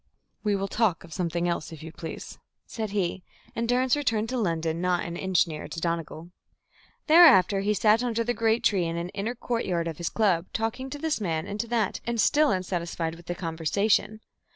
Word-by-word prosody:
"We 210 -2 +1
will 195 0 -2
talk 210 -5 0
of 165 - -11
something 170 +1 -1
else, 170 -2 -2
if 155 -2 -10
you 160 - -8
please," 165 0 -8 0.3
said 220 -2 -4
he; 190 -2 -1 0.3
and 230 0 -2
Durrance 255 +1 +3
returned 225 -6 0
to 255 - -2
London 165 -4 -1
not 180 -1 +1
an 170 - -5
inch 190 -1 +2
nearer 155 -2 -7
to - - -6
Donegal. 165 0 -4 0.7
Thereafter 305 - +7
he 210 +2 +1
sat 215 +2 +4
under 230 -2 0
the 245 +1 -1
great 225 0 +1
tree 190 -4 +2
in 165 0 -2
the 170 +1 -3
inner 215 +5 -3
courtyard 195 -9 -2
of 165 -1 -5
his 170 - -2
club, 185 -6 +1
talking 225 +4 -2
to 290 - -6
this 310 -5 -2
man 160 -5 -1
and 205 +1 -6
to 235 - -2
that, 230 -4 0
and 235 0 -2
still 300 +6 +4
unsatisfied 175 -3 -2
with 170 0 -14
the 175 - -3
conversation. 195 +6 0
195 Hz, 200 wpm, -26 LUFS, 170-230 Hz, 0.7 s, Thereafter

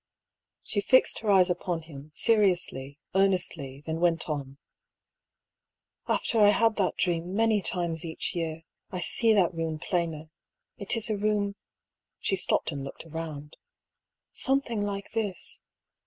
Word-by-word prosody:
She 205 - -1
fixed 260 +5 +4
her 220 - -3
eyes 185 -2 +5
upon 175 -2 -2
him, 150 -2 -11
seriously, 180 -10 +2 0.2
earnestly; 175 -8 0
then 160 0 -2
went 170 -1 +2
on: 140 -3 -4 0.7
" - - -61 0.7
After 230 - +1
I 205 -1 +7
had 225 +1 +3
that 195 -3 +1
dream 175 +1 -1
many 220 -1 +3
times 170 -3 -1
each 160 -1 -3
year, 165 -2 -3 0.3
I 185 - -4
see 225 +5 +3
that 185 -4 +3
room 165 -1 -2
plainer. 160 -1 -2 0.5
It 200 +4 -1
is 225 0 -1
a 210 - 0
room" 205 -1 0 0.6
(she 195 - 0
stopped 185 - 0
and 140 -2 -5
looked 135 - -8
round) 155 -2 -7 0.8
"something 265 -5 +1
like 200 -1 -4
this. 210 -5 -3
180 Hz, 140 wpm, -28 LUFS, 160-205 Hz, 0.8 s, I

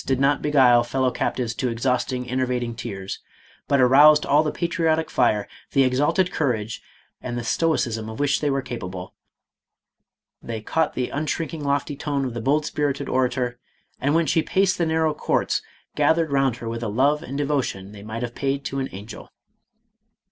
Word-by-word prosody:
did 130 -1 +1
not 140 +2 +2
beguile 130 -5 +5
fellow 130 +1 0
captives 120 -2 -2
to 125 +1 -1
exhausting, 125 +1 -1
enervating 125 -2 -1
tears, 100 -5 -6 0.5
but 140 - +3
aroused 145 +4 +7
all 145 +2 +4
the 155 -1 -1
patriotic 165 -2 0
fire, 110 -5 +2 0.3
the 135 - +5
exalted 145 +8 +2
courage, 115 -7 -1 0.4
and 120 -1 -4
the 120 - -3
stoicism 115 -6 0
of 110 - -8
which 145 -1 +1
they 150 - +1
were 135 -1 0
capable; 95 -7 -6 1.3
they 115 -1 -5
caught 160 +9 -1
the 125 -1 -1
unshrinking 155 +1 -3
lofty 140 +1 -1
tone 140 -1 -2
of 125 - -4
the 120 - -4
bold 145 +5 +1
spirited 145 -2 -1
orator, 125 -1 0 0.4
and 145 +3 +1
when 165 0 +3
she 160 - +2
paced 190 +2 +1
the 170 - +2
narrow 160 -1 +1
courts, - - 0 0.3
gath 160 - +3
ered 165 -3 0
round 135 -3 +2
her 120 -1 -8
with 115 +1 -4
a 115 - -2
love 140 +8 +2
and 135 +2 -6
devotion 135 -10 -2
they 105 -1 -11
might 110 +3 -5
have 120 -1 -4
paid 140 +1 -2
to 135 - -3
an 135 - -2
angel. 100 +4 -9
135 Hz, 175 wpm, -23 LUFS, 120-150 Hz, 1.3 s, aroused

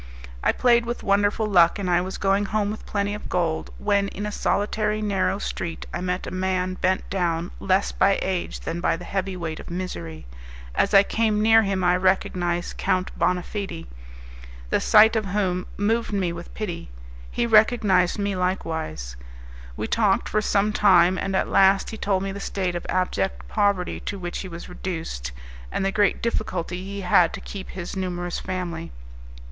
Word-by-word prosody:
I - - +4
played 240 -1 +3
with 240 +1 -4
wonderful 205 +1 +2
luck, 175 -4 +4
and 200 -2 -3
I 175 0 +3
was 190 +1 -5
going 195 +1 +2
home 205 0 0
with 215 - -8
plenty 205 0 -1
of 210 - -7
gold, 170 -3 -1
when 200 -1 +1
in 205 +1 -5
a 210 - -3
solitary 210 +1 0
narrow 200 -2 0
street 170 -4 -4
I - - -3
met 180 0 -2
a - - -6
man 185 0 -1
bent 185 +1 0
down 175 -2 -1
less 190 +1 +1
by 195 0 +3
age 185 -2 -3
than 170 +1 -4
by 165 - +1
the 175 - -9
heavy 195 0 -2
weight 165 -3 -4
of - - -10
misery. 85 - -5 0.5
As 200 - +2
I 195 - +9
came 215 0 +1
near 225 +1 +6
him 195 -3 -1
I 180 0 +4
recognized 180 -2 0
Count 185 -1 0
Bonafede, 180 -1 -2 0.9
the - - +3
sight 220 +1 +6
of 220 -2 0
whom 185 -2 -1
moved 225 +3 0
me 185 -4 0
with 170 0 -9
pity. 175 - -5 0.4
He 235 - -1
recognized 210 -5 +4
me 200 -1 -1
likewise. 160 - -3 0.6
We - - -2
talked 205 - +2
for 215 - +1
some 210 0 +1
time, 185 -4 +5
and 195 0 -2
at - - +1
last 195 0 +4
he 220 - -6
told 195 -2 0
me 195 - -3
the 200 - -6
state 190 -2 -2
of 175 - -5
abject 95 - -1
poverty 200 - 0
to 205 - -5
which 175 -2 -5
he 190 - -5
was 170 -1 -8
reduced, 165 - -5 0.4
and - - -1
the 195 - +1
great 205 -1 +1
difficulty 185 -6 -2
he 200 +1 -6
had 175 -2 +4
to - - -5
keep 195 -2 -8
his 185 0 -6
numerous 175 -2 -3
family. 175 -3 -4
190 Hz, 180 wpm, -24 LUFS, 175-205 Hz, 0.9 s, I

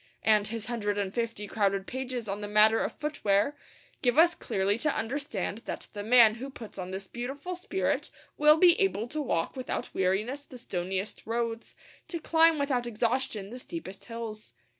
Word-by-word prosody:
And 215 -1 +4
his 225 0 -4
hundred 205 -4 -1
and 200 -1 -1
fifty 230 -3 -2
crowded 200 -2 0
pages 255 -2 -4
on 200 +1 -3
the 205 - -4
matter 215 +2 +5
of - - -1
footwear 280 -4 0 0.5
give 245 0 +2
us 340 +2 +7
clearly 200 - -1
to 305 +4 +2
understand 225 -4 -2
that - - -5
the 205 - -4
man 225 0 +7
who 270 - -4
puts 225 -6 -10
on 180 0 -4
this 190 +1 -5
beautiful 270 - -5
spirit 380 +1 -1 0.3
will 300 +1 +6
be 350 +1 +7
able 245 - +1
to 305 +3 -2
walk 165 - 0
without 255 -1 -4
weariness 210 +10 0
the 265 -3 -12
stoniest 190 -3 -4
roads, 230 0 -2
and - - -24
to 340 - -3
climb 325 0 +4
without 265 -4 0
exhaustion 230 -2 -1
the 250 - -7
steepest 250 - -7
hills. 230 -2 -7
230 Hz, 180 wpm, -29 LUFS, 205-275 Hz, 0.5 s, us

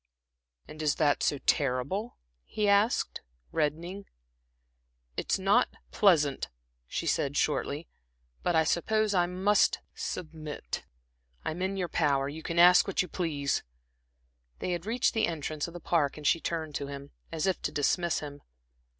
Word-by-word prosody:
"And 155 - -9
is 150 -2 +2
that 145 -2 +2
so 145 - +2
terrible?" 145 - 0 0.3
he 210 - -1
asked, 200 +3 +2 0.3
reddening. 170 +7 -2 1.1
"It's - - 0
not 195 +6 +3 0.2
pleasant," 155 - +3 0.4
she - - -3
said, 140 +1 0
shortly 150 +1 0 0.5
"but 175 - +1
I 160 - +5
suppose 215 +6 +1
I 175 -2 +3
must 190 +3 +3 0.2
submit. 155 - -5 0.6
I'm 165 +3 -3
in 190 +1 -1
your 180 -2 -1
power; 140 -4 +1
you 150 +3 -6
can 165 +1 -4
ask 175 +1 +7
what 195 - +1
you - - -7
please." 150 -7 -1 1.0
They 185 - -3
had 175 +2 -3
reached 235 +2 +2
the 225 -1 +2
entrance 155 -1 -3
of 170 - -11
the - - -5
Park, 155 -4 +1
and 150 - -9
she 165 - +4
turned 160 -2 -3
to 140 - -5
him, 140 0 -8 0.2
as 160 -2 -1
if 190 -1 0
to - - -2
dismiss 165 +3 +1
him. 145 -1 -8
165 Hz, 150 wpm, -29 LUFS, 150-185 Hz, 1.1 s, ask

